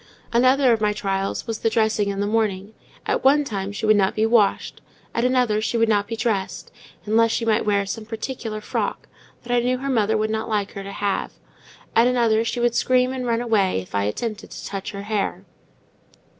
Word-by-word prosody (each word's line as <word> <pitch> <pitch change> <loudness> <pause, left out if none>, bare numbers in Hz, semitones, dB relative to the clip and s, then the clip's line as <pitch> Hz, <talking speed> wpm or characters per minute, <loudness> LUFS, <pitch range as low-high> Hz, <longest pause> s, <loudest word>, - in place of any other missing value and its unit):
Another 255 +1 +4
of 225 - -1
my 210 -1 +2
trials 195 -1 -2
was 225 -2 -4
the 225 - +1
dressing 220 -2 +1
in 200 0 -2
the - - +1
morning: 210 -2 -1 0.3
at - - -1
one 285 +3 +5
time 200 -6 -4
she 205 +2 -4
would 215 0 +5
not 195 -2 +2
be 215 - +2
washed; 225 -3 +1 0.3
at 235 - 0
another 250 -4 +2
she 230 +2 -1
would 230 0 +3
not 205 -2 +1
be 230 - -4
dressed, 195 -6 -2 0.3
unless 225 +2 +3
she 230 - -1
might 220 -1 +1
wear 200 -1 +2
some 215 +3 -5
particular 220 0 -5
frock, - - -3 0.4
that 245 0 -3
I - - +4
knew 250 +1 0
her 275 +2 -3
mother 220 -3 +2
would 215 0 -1
not 220 +1 -2
like 205 -2 -1
her 200 - -7
to 195 0 -7
have; 200 0 -2 0.6
at 230 +2 +5
another 230 -3 +2
she 230 +2 -2
would 240 -1 +2
scream 255 +1 +2
and 255 -1 -4
run 230 0 +1
away 210 - +1
if 90 - -10
I 100 0 +1
attempted 215 - -4
to - - -9
touch 195 -1 -5
her 200 -1 -7
hair. 210 -1 -2
220 Hz, 210 wpm, -22 LUFS, 205-235 Hz, 0.6 s, one